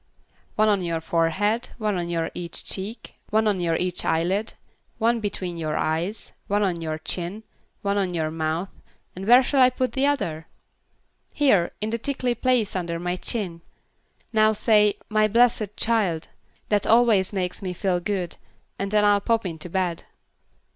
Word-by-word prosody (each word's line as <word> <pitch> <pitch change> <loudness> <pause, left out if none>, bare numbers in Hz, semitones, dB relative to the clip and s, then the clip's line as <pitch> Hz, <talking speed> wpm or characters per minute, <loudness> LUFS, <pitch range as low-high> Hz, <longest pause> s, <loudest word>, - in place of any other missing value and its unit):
"One 215 0 +3
on 205 -3 +3
your 165 -1 -1
forehead; 170 +8 0
one 215 -3 -1
on 170 -2 -2
each 170 -1 -4
cheek; 215 +4 -4 0.2
one 220 +1 +2
on 200 -4 +1
each 175 +1 0
eyelid; 185 +7 0 0.4
one 230 +1 +2
between 185 -5 -4
the 165 - -4
eyes; 160 +6 -2 0.2
one 205 +1 +1
on 175 -4 -1
your 155 -1 -3
chin; 180 +6 -4 0.4
one 200 0 +1
on 190 -2 0
your 160 -3 -1
mouth, 160 +3 -2 0.5
and 190 +2 -6
where 245 +3 +8
shall 270 +1 +2
I 255 - +7
put 255 0 -1
the 275 +1 +1
other?" 165 - -1 0.9
"Here, 205 -12 +3
in 215 +1 -2
the 230 - -1
tickley 255 -1 -1
place 240 -4 +1
under 170 -2 -2
my 175 +1 -2
chin. 180 -4 -3 0.7
Now 215 0 +4
say 210 -1 +3
'my 215 0 +3
blessed 220 -2 +2
child'; 200 -8 0 0.4
that 205 -1 +1
always 225 -5 +4
makes 180 -3 -3
me 185 -2 -3
feel 180 0 0
good, 180 -1 -3 0.4
and 195 - -2
then 210 0 +3
I'll 205 -1 +4
pop 225 0 +1
into 165 -1 -6
bed." 180 -2 -2
195 Hz, 160 wpm, -24 LUFS, 170-220 Hz, 0.9 s, where